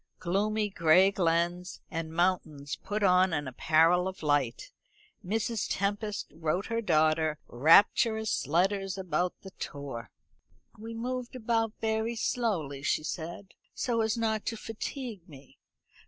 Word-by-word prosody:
Gloomy 210 +4 0
gray 175 +2 +5
glens 175 -1 0
and 165 -1 -4
mountains 160 -5 -1
put 210 0 -4
on 185 -1 +4
an 145 -3 -1
apparel 165 +7 +3
of 190 -3 -7
light. 145 - 0 0.5
Mrs. 220 +2 -1
Tempest 205 +1 -2
wrote 165 +4 -1
her 230 0 -1
daughter 155 -4 +2
rapturous 205 - +4
letters 195 +5 +1
about 180 -1 -1
the 190 - -10
tour. 135 -5 -6 0.7
"We 225 +2 -8
move 250 +2 -3
about 225 -2 0
very 220 +1 0
slowly," 185 - -1
she 150 - 0
said, 170 +5 -6 0.3
"so 235 -3 0
as 220 +1 0
not 220 -2 0
to 225 - -2
fatigue 225 - -6
me. 140 -2 -15
185 Hz, 125 wpm, -29 LUFS, 160-220 Hz, 0.7 s, gray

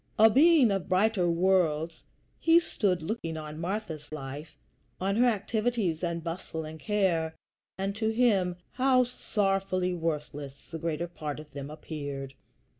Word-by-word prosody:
A 220 +1 +7
being 290 -2 +6
of 195 -2 -2
brighter 185 -1 +3
worlds, 170 -3 +2 0.4
he 330 +1 +6
stood 195 - 0
looking 165 -4 -3
on 155 0 -6
Martha's 170 -6 -4
life, 145 +1 -7 0.4
on 195 +2 0
her 245 +1 +5
activities 215 -5 0
and 170 -1 -2
bustle 165 -1 -5
and 155 +1 -8
care; 175 -6 +1 0.4
and 195 +1 -2
to 220 -1 +1
him 215 -6 +2 0.2
how 255 0 +4
sorrowfully 195 -6 0
worthless 150 -4 -3 0.2
the 165 - -5
greater 165 +1 -2
part 150 -4 -5
of 155 -1 -11
them 140 0 -6
appeared! 145 -3 -6
180 Hz, 140 wpm, -29 LUFS, 155-210 Hz, 0.4 s, A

